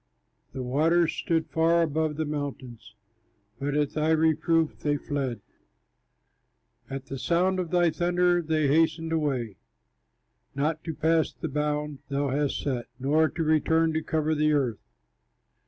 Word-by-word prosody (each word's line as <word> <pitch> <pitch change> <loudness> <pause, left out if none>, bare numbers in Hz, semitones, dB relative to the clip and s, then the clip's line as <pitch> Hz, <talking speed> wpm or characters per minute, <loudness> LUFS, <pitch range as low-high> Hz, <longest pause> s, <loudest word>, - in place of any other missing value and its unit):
The 130 -1 -4
waters 160 +6 +2
stood 165 -1 0
far 165 +1 +3
above 155 -1 -1
the 155 +1 -2
mountains, 140 -7 -6 0.6
But 145 +1 -1
at 145 -1 +1
thy 155 +1 0
reproof 160 0 +2
they 145 -1 0
fled, 135 -6 -3 1.5
At 135 0 -5
the 135 -1 -6
sound 180 +7 +1
of 175 -3 -2
thy 175 -1 +3
thunder 175 +1 +2
they 155 -2 0
hastened 160 +2 +2
away, 135 -10 -1 1.0
Not 155 +3 -1
to 160 -2 -4
pass 160 0 +2
the 160 - -6
bound 150 0 -2
thou 140 0 -1
hadst 140 +1 -1
set, 125 -4 -2
Not 150 +4 +1
to 165 - -1
return 160 +1 +2
to 160 - 0
cover 155 0 0
the 155 0 +2
earth. 125 -8 0
155 Hz, 140 wpm, -27 LUFS, 140-160 Hz, 1.5 s, far